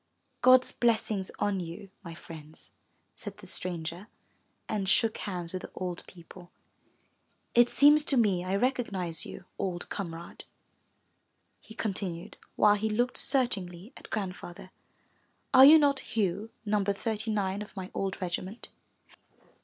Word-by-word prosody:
*'God's 255 Hz, +1 st, +6 dB
blessings 220 Hz, -5 st, 0 dB
on 205 Hz, -2 st, 0 dB
you, 175 Hz, +3 st, -8 dB
my 170 Hz, -3 st, -8 dB
friends,'' 160 Hz, -2 st, -12 dB, 0.4 s
said -, -, -9 dB
the -, -, -13 dB
stranger 175 Hz, +2 st, -3 dB, 0.6 s
and 200 Hz, -3 st, -2 dB
shook 220 Hz, +2 st, +3 dB
hands 175 Hz, -3 st, -4 dB
with 185 Hz, -, -3 dB
the -, -, -9 dB
old 180 Hz, -2 st, -4 dB
people. 175 Hz, 0 st, -14 dB, 1.1 s
*lt 240 Hz, 0 st, +6 dB
seems 295 Hz, +1 st, +6 dB
to 275 Hz, -, +3 dB
me 200 Hz, -6 st, +2 dB
I 185 Hz, +1 st, -1 dB
recognize 200 Hz, -8 st, -1 dB
you, 180 Hz, -, -10 dB
old 180 Hz, -3 st, -3 dB
comrade,'* 170 Hz, -4 st, -7 dB, 1.1 s
he 220 Hz, -, -14 dB
con 215 Hz, -3 st, -2 dB
tinued, 175 Hz, -3 st, -5 dB, 0.2 s
while 210 Hz, -1 st, +5 dB
he 220 Hz, +2 st, -1 dB
looked 240 Hz, +4 st, 0 dB
searchingly 210 Hz, -6 st, 0 dB
at -, -, -12 dB
Grandfather. 185 Hz, -3 st, -6 dB, 0.8 s
'*Are 260 Hz, +1 st, +10 dB
you 305 Hz, +3 st, +10 dB
not 285 Hz, -3 st, +3 dB
Hugh 205 Hz, 0 st, -2 dB, 0.2 s
No. 210 Hz, -1 st, +1 dB
39 205 Hz, -1 st, -2 dB
of 210 Hz, -, -10 dB
my 190 Hz, -1 st, -6 dB
old 195 Hz, -1 st, -3 dB
regiment?" 185 Hz, +5 st, -5 dB
195 Hz, 135 wpm, -29 LUFS, 180-225 Hz, 1.1 s, Are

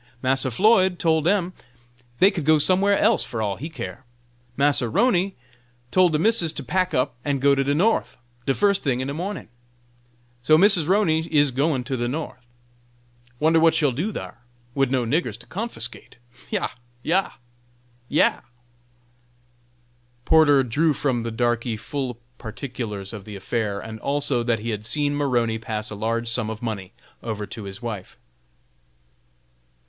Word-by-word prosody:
Massa 130 Hz, +1 st, +1 dB
Floyd 190 Hz, -, +3 dB
tole 160 Hz, -2 st, +2 dB
dem 180 Hz, +2 st, +1 dB, 0.7 s
dey 195 Hz, +2 st, +6 dB
could 165 Hz, -, -4 dB
go 155 Hz, +2 st, +5 dB
somewhere 190 Hz, +6 st, +3 dB
else 220 Hz, +1 st, +3 dB
fur 115 Hz, -, -5 dB
all 100 Hz, -3 st, -1 dB
he 155 Hz, +6 st, -6 dB
care. 135 Hz, -5 st, -7 dB, 0.5 s
Massa 140 Hz, -3 st, +2 dB
'Roney 195 Hz, -, +2 dB, 0.6 s
tole 185 Hz, -1 st, +5 dB
de 155 Hz, -, +1 dB
missus 175 Hz, -2 st, +2 dB
to 145 Hz, -, -5 dB
pack 185 Hz, +6 st, 0 dB
up 125 Hz, +1 st, +1 dB
and 140 Hz, -2 st, -1 dB
go 140 Hz, +1 st, +4 dB
to 135 Hz, 0 st, +2 dB
de 140 Hz, +1 st, 0 dB
North, 220 Hz, +8 st, +1 dB, 0.3 s
de 135 Hz, -, +2 dB
fust 200 Hz, -1 st, +3 dB
ting 130 Hz, -4 st, 0 dB
in 130 Hz, -, -2 dB
de 140 Hz, -, -3 dB
morning. 185 Hz, +6 st, -5 dB, 0.9 s
So 155 Hz, +5 st, +5 dB
Missus 180 Hz, -3 st, +5 dB
'Roney 170 Hz, -5 st, +2 dB
is 145 Hz, -2 st, +3 dB
gwine 135 Hz, 0 st, 0 dB
to 130 Hz, +2 st, -3 dB
go 120 Hz, 0 st, -1 dB
North. 130 Hz, -3 st, -5 dB, 0.9 s
Wonder 160 Hz, +2 st, +4 dB
what 165 Hz, 0 st, +4 dB
she'll 150 Hz, -4 st, +3 dB
do 165 Hz, -, -2 dB
thar, -, -, -7 dB, 0.3 s
wid 135 Hz, -1 st, +1 dB
no 130 Hz, -2 st, 0 dB
niggers 125 Hz, -3 st, -1 dB
to 120 Hz, -, -16 dB
confusticate? 180 Hz, -, -6 dB, 0.3 s
Yah! -, -, -1 dB, 0.3 s
yah! 190 Hz, +4 st, +1 dB, 0.8 s
yah!" -, -, +3 dB, 1.8 s
Porter 145 Hz, -4 st, +5 dB
drew 150 Hz, +6 st, +1 dB
from 130 Hz, -4 st, 0 dB
the 115 Hz, 0 st, -4 dB
darkey 120 Hz, 0 st, 0 dB
full 130 Hz, 0 st, -4 dB, 0.2 s
particulars 110 Hz, -4 st, -6 dB
of 105 Hz, -3 st, -7 dB
the 105 Hz, -2 st, -8 dB
affair, 100 Hz, +1 st, -2 dB
and 110 Hz, +1 st, -8 dB
also 140 Hz, -2 st, 0 dB
that 115 Hz, -1 st, +1 dB
he 115 Hz, +2 st, -4 dB
had 105 Hz, -1 st, -4 dB
seen 145 Hz, +5 st, 0 dB
Maroney 120 Hz, -6 st, 0 dB
pass 110 Hz, -1 st, -4 dB
a -, -, -5 dB
large 115 Hz, +3 st, -2 dB
sum 115 Hz, -1 st, -1 dB
of 110 Hz, +1 st, -7 dB
money 100 Hz, -5 st, -4 dB, 0.3 s
over 110 Hz, -3 st, -4 dB
to 110 Hz, 0 st, -7 dB
his 100 Hz, +4 st, -8 dB
wife. 105 Hz, -6 st, -6 dB
135 Hz, 160 wpm, -23 LUFS, 115-165 Hz, 1.8 s, dey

